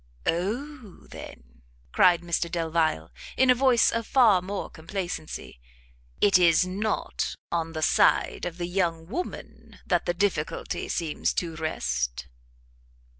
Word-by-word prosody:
"O, 225 - -3
then," - - -12 0.3
cried 175 - +5
Mr 170 0 -1
Delvile, 160 - 0 0.3
in 260 -1 +5
a - - +7
voice 250 -2 +4
of 230 -1 -2
far 225 -8 +5
more 195 +2 -4
complacency, 165 - -6 0.6
"it 195 -2 +5
is 170 -1 +5
not 200 +4 -2 0.2
on 165 -1 -2
the 155 -1 -3
side - - +3
of 175 -1 -5
the 175 - -2
young 170 -3 -1
woman 260 - -7
that 175 -2 0
the 175 - 0
difficulty 175 -5 -2
seems 165 -3 -1
to 165 -2 -2
rest?" 60 - -2
175 Hz, 125 wpm, -26 LUFS, 160-205 Hz, 0.6 s, a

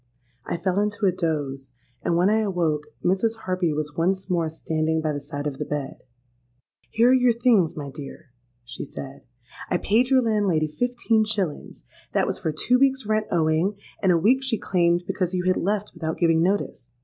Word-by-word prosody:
I - - -2
fell 180 +3 0
into 210 0 0
a 190 - +4
doze; 145 -7 -3 0.3
and 170 - 0
when 180 +2 +4
I 215 +2 +3
awoke, 170 -8 -1 0.2
Mrs. 220 +5 +1
Harpy 185 -3 0
was 150 -1 -3
once 185 +3 0
more 170 -3 +1
standing 160 0 -1
by 155 -1 -1
the 145 - -4
side 145 0 -6
of 140 -2 -4
the - - -1
bed. 145 -2 -4 0.9
'Here 235 +3 +4
are - - +6
your 250 -2 +4
things, 230 -10 +2
my 140 -2 -5
dear,' 140 +1 -10 0.3
she 125 - -6
said: 135 -1 -8 0.5
'I 180 - +2
paid 230 +8 +2
your 260 -2 +4
landlady 200 -8 +1
fifteen 235 +4 +1
shillings. 200 -8 -3 0.3
That - - +2
was - - -3
for 160 - -1
two 245 +11 +1
weeks' 270 -2 +2
rent 215 0 0
owing, 165 +4 +1 0.2
and 190 - +4
a 170 - +4
week 235 +10 +3
she 260 -4 -1
claimed 175 -2 +1
because 185 -2 -2
you 180 - -1
had 185 0 +2
left 205 +2 -1
without 160 -2 -4
giving 165 -2 +3
notice. 170 - -1
180 Hz, 190 wpm, -24 LUFS, 155-215 Hz, 0.9 s, are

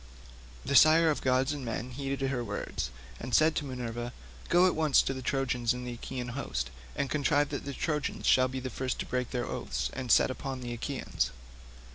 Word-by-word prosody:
The 140 - 0
sire 160 +2 +7
of 150 - -2
gods 130 +2 +2
and 145 -2 -5
men 120 +1 -4
heeded 135 +1 -2
her 125 -3 -1
words, 100 - -3 0.3
and 125 - -1
said 155 +1 +5
to 150 - -1
Minerva, 120 -2 -4 0.4
"Go 175 +1 +6
at 185 - +4
once 155 -3 +4
into 135 - -1
the 130 - -6
Trojan 130 -2 -1
and 125 0 -6
Achaean 125 +1 -5
hosts, 70 - -3 0.2
and 140 - 0
contrive 145 0 +2
that 140 -2 -4
the 140 - -4
Trojans 150 -3 -2
shall 130 0 +5
be 130 +1 -4
the 130 0 -5
first 130 -1 -2
to - - -4
break 125 -1 -2
their 125 -2 -2
oaths - - -3
and 130 -3 -3
set - - +5
upon 135 -1 -5
the 120 -1 -4
Achaeans." 120 - -2
130 Hz, 200 wpm, -30 LUFS, 125-140 Hz, 0.4 s, sire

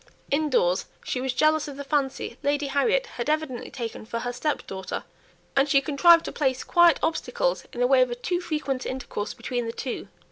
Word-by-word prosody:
Indoors 280 - +2 0.2
she 250 - -2
was 265 0 0
jealous 310 +4 +2
of 280 -2 -8
the 280 - -5
fancy 275 -4 -1
Lady 285 0 +1
Harriet 450 - +2
had 255 - -5
evidently 310 -5 -1
taken 235 -4 -6
for 230 +1 -4
her 245 0 -3
step 295 +5 -2
daughter, 190 -1 -5 0.5
and 275 +1 +3
she 275 - +6
contrived 315 +4 +5
to - - -4
place 260 -3 0
quiet 345 -3 +5
obstacles - - 0
in 245 - -5
the - - +5
way 265 0 +5
of 255 - +3
a 240 - -3
too 350 +8 -2
frequent 300 -6 -2
intercourse 255 -5 -4
between 245 -2 -3
the - - -2
two. 250 +2 -5
275 Hz, 200 wpm, -26 LUFS, 250-310 Hz, 0.5 s, she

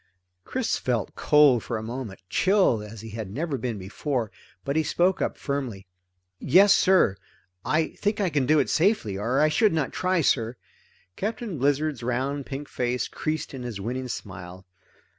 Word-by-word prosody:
Chris 255 -2 -1
felt 120 -4 -1
cold 145 -5 +5
for 120 - -3
a 110 - -5
moment, 115 -3 -6
chilled 185 - +3
as 105 0 -9
he 110 -1 -9
had 110 -2 -5
never 150 - -2
been 120 -3 -3
before, 115 +4 -3 0.3
but 140 - -1
he 160 - +4
spoke 180 +4 +1
up - - -1
firmly. 130 -9 -4 0.5
"Yes 195 +3 +6
sir. 185 - +4 0.5
I 155 +1 +1
think 205 +1 -2
I 190 -4 +1
can 140 -4 +1
do 155 +2 +5
it - - +2
safely, 165 - +2
or 125 +6 0
I 155 - +5
should 210 +5 +3
not 155 -4 -1
try, 185 -1 +1
sir." 120 -4 +1 0.6
Captain 215 - -4
Blizzard's 145 0 +1
round 130 +3 -2
pink 140 +1 -6
face 125 0 -1
creased 155 -1 -3
in 130 - -6
his 120 -5 -5
winning 125 +5 -3
smile. 95 -5 -8
135 Hz, 170 wpm, -26 LUFS, 115-160 Hz, 0.6 s, Yes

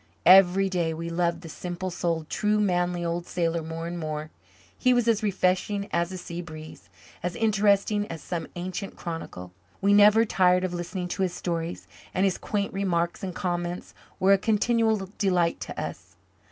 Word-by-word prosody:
Every 190 +1 +7
day 170 -4 -1
we 165 +1 -5
loved 170 0 0
the 170 - -9
simple 180 +3 -5
souled, 170 -2 -2
true, 210 +3 +1
manly 175 -3 +1
old 170 +1 -2
sailor 170 -1 -1
more 165 +1 -5
and 170 +1 -4
more. 155 -1 -4 0.4
He 255 -1 +3
was 240 -1 +2
as 225 -2 +3
refreshing 200 0 0
as 170 +1 +1
a 185 - -5
sea 175 -1 -6
breeze, 155 - -11 0.3
as 180 -1 -3
interesting 205 -1 +2
as 165 - -6
some 170 -2 -4
ancient 185 +3 -5
chronicle. 125 - -7 0.3
We 200 +1 +3
never 210 +2 +7
tired 180 -3 +3
of 185 -1 -2
listening 180 +1 -4
to 195 - -3
his 180 -2 0
stories, 170 -1 -4 0.3
and 190 - +3
his 190 - 0
quaint 200 -1 -2
remarks 175 -3 -1
and 185 -2 -4
comments 175 0 -3 0.3
were 195 +1 +5
a 195 - +4
continual 220 -1 +1
delight 180 -4 +2
to - - -6
us. - - -7
180 Hz, 175 wpm, -26 LUFS, 170-200 Hz, 0.4 s, Every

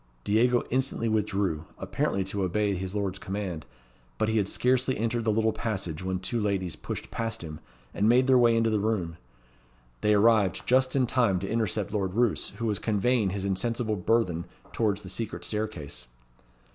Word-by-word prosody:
Diego 120 +4 +3
instantly 130 -2 0
withdrew, 100 -7 0
apparently 100 - -1
to 95 +1 -3
obey 100 +2 +1
his 95 +1 -4
lord's 100 -2 -2
command; 95 -5 -4 0.5
but 110 - +1
he 110 - +1
had 100 - 0
scarcely 130 +1 +2
entered 115 +1 -1
the 110 - +3
little 110 +1 +2
passage 95 -8 -3
when 95 0 -1
two 95 +6 -2
ladies 95 -5 -1
pushed - - -6
past 115 -5 -3
him, 75 -2 -7 0.3
and 105 +2 +2
made 125 +2 +5
their 130 -1 +5
way 120 -1 +5
into 115 -1 +2
the 105 - +2
room. 95 -6 -1 0.8
They 105 0 +4
arrived 105 -3 +3
just 130 +1 +3
in 130 -2 +3
time 120 -6 +2
to 95 - -3
intercept 110 -3 -1
Lord 95 -3 -1
Roos, 120 -2 +1
who 115 - -3
was 105 -3 0
conveying 110 0 +1
his 95 +1 -3
insensible 110 +3 -1
burthen 90 -4 +1 0.3
towards 105 -3 0
the - - -9
secret 110 +3 -4
staircase. 105 - -4
105 Hz, 175 wpm, -28 LUFS, 95-115 Hz, 0.8 s, made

